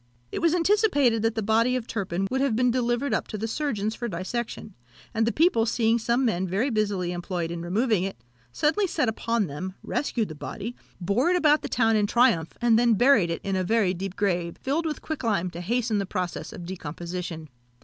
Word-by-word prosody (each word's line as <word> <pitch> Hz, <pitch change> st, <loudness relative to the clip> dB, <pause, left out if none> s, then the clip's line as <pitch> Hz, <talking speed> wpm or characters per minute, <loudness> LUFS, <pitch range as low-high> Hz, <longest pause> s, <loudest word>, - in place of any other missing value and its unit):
It -, -, -3 dB
was 335 Hz, 0 st, +3 dB
anticipated 330 Hz, -, +3 dB
that 225 Hz, +1 st, 0 dB
the 220 Hz, -, -1 dB
body 230 Hz, +4 st, +2 dB
of 250 Hz, -3 st, -2 dB
Turpin 195 Hz, -4 st, -2 dB
would 265 Hz, +1 st, +1 dB
have 275 Hz, -5 st, +1 dB
been 250 Hz, +1 st, +3 dB
delivered 240 Hz, +1 st, 0 dB
up -, -, -1 dB
to 215 Hz, -, -5 dB
the 220 Hz, +2 st, -3 dB
surgeons 220 Hz, -5 st, -2 dB
for 240 Hz, +1 st, -4 dB
dissection; 215 Hz, +3 st, -4 dB, 0.4 s
and 225 Hz, 0 st, +1 dB
the -, -, +2 dB
people 290 Hz, -8 st, +3 dB
seeing 225 Hz, 0 st, +2 dB
some 235 Hz, +3 st, +1 dB
men 190 Hz, -5 st, 0 dB
very 205 Hz, +10 st, 0 dB
busily 200 Hz, -5 st, 0 dB
employed 175 Hz, -1 st, -3 dB
in 170 Hz, 0 st, -4 dB
removing 205 Hz, +3 st, +1 dB
it, 195 Hz, -7 st, -4 dB, 0.3 s
suddenly 320 Hz, -, +1 dB
set 305 Hz, -7 st, 0 dB
upon 230 Hz, 0 st, 0 dB
them, 185 Hz, +5 st, -6 dB
rescued 235 Hz, -8 st, -1 dB
the -, -, -6 dB
body, 210 Hz, +9 st, -6 dB, 0.2 s
bore 200 Hz, -, +1 dB
it 360 Hz, -, +3 dB
about 310 Hz, -3 st, +4 dB
the -, -, -5 dB
town 225 Hz, -2 st, +2 dB
in 210 Hz, -1 st, +2 dB
triumph, 200 Hz, -9 st, +2 dB
and 230 Hz, -2 st, +4 dB
then 235 Hz, -2 st, +4 dB
buried 235 Hz, -6 st, +4 dB
it 165 Hz, -, -3 dB
in 195 Hz, -1 st, -1 dB
a 185 Hz, -, 0 dB
very 205 Hz, -1 st, +2 dB
deep 190 Hz, +1 st, -5 dB
grave, 175 Hz, -4 st, -1 dB
filled 315 Hz, +5 st, -1 dB
with 305 Hz, -, -4 dB
quicklime, 220 Hz, -, -1 dB
to 170 Hz, -, -7 dB
hasten 225 Hz, +2 st, 0 dB
the 195 Hz, -, -2 dB
progress 180 Hz, -3 st, -4 dB
of 175 Hz, -, -8 dB
decomposition. 170 Hz, -1 st, -6 dB
220 Hz, 210 wpm, -26 LUFS, 185-245 Hz, 0.4 s, about